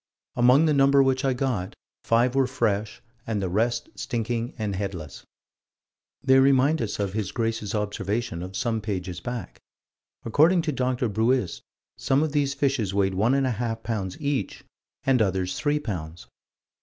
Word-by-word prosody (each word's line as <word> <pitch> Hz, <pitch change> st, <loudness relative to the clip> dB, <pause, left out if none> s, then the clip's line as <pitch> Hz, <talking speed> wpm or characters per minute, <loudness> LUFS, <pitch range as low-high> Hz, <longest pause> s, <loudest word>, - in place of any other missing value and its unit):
"Among 125 Hz, +6 st, +5 dB
the 155 Hz, -, +3 dB
number 140 Hz, 0 st, +5 dB
which 135 Hz, +1 st, +1 dB
I 135 Hz, -1 st, +2 dB
got, 125 Hz, -8 st, -2 dB, 0.3 s
five 120 Hz, +2 st, +2 dB
were 135 Hz, -1 st, +2 dB
fresh 105 Hz, -5 st, -1 dB, 0.2 s
and 110 Hz, -2 st, -1 dB
the 95 Hz, -2 st, -2 dB
rest 115 Hz, +6 st, 0 dB
stinking 120 Hz, 0 st, -3 dB
and 105 Hz, -3 st, -2 dB
headless." 95 Hz, -6 st, -6 dB, 1.0 s
They 130 Hz, 0 st, +5 dB
remind 135 Hz, +3 st, +4 dB
us 110 Hz, -3 st, -2 dB
of 100 Hz, -2 st, -1 dB
His 105 Hz, -3 st, -2 dB
Grace's 115 Hz, -3 st, -2 dB
observation 105 Hz, -2 st, -2 dB
of 95 Hz, +2 st, -7 dB
some 115 Hz, -2 st, -1 dB
pages 90 Hz, -4 st, -4 dB
back. 120 Hz, +5 st, -6 dB, 0.7 s
According 160 Hz, +9 st, +4 dB
to 160 Hz, -, -1 dB
Dr. 125 Hz, -2 st, 0 dB
Buist, 110 Hz, -2 st, 0 dB, 0.4 s
some 135 Hz, +3 st, +2 dB
of 155 Hz, -, -1 dB
these 140 Hz, -2 st, 0 dB
fishes 130 Hz, -9 st, 0 dB
weighed 95 Hz, -1 st, +2 dB
one 110 Hz, +8 st, +2 dB
and 135 Hz, -1 st, +2 dB
a 130 Hz, -, +1 dB
half 115 Hz, 0 st, -3 dB
pounds 100 Hz, -5 st, -3 dB
each 140 Hz, -9 st, -2 dB, 0.4 s
and 130 Hz, -3 st, +3 dB
others 95 Hz, -2 st, 0 dB
three 145 Hz, 0 st, +1 dB
pounds. 85 Hz, -, -6 dB
115 Hz, 160 wpm, -25 LUFS, 100-135 Hz, 1.0 s, Among